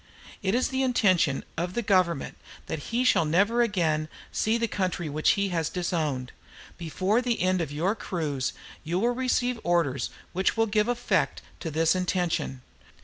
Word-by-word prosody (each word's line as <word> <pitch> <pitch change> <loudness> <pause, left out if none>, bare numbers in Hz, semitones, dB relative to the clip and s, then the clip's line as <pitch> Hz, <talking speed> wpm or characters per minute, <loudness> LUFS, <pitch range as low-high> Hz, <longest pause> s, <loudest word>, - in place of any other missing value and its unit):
"It 195 +2 +1
is 255 - +1
the 265 0 -1
intention 185 - +2
of 175 +2 -2
the 235 - 0
Government 185 -7 +1 0.3
that 150 - -5
he 240 +2 +1
shall 255 - +4
never 200 +10 +3
again 165 -9 +1 0.2
see 220 +2 +1
the 230 0 0
country 185 -5 -2
which 155 +2 +3
he 200 -1 0
has 165 -3 -1
disowned. 155 -8 -2 0.4
Before 185 +7 0
the 245 -2 -1
end 185 0 +2
of 155 -4 -3
your 170 +7 0
cruise 155 - -2 0.3
you 170 +2 -1
will 235 +6 +2
receive 250 -1 0
orders 165 -6 +1 0.2
which 190 +5 +1
will 225 - +4
give 210 0 +1
effect 245 0 0 0.2
to 165 - -4
this 160 +1 +2
intention. 180 -8 -1
185 Hz, 165 wpm, -27 LUFS, 160-225 Hz, 0.4 s, shall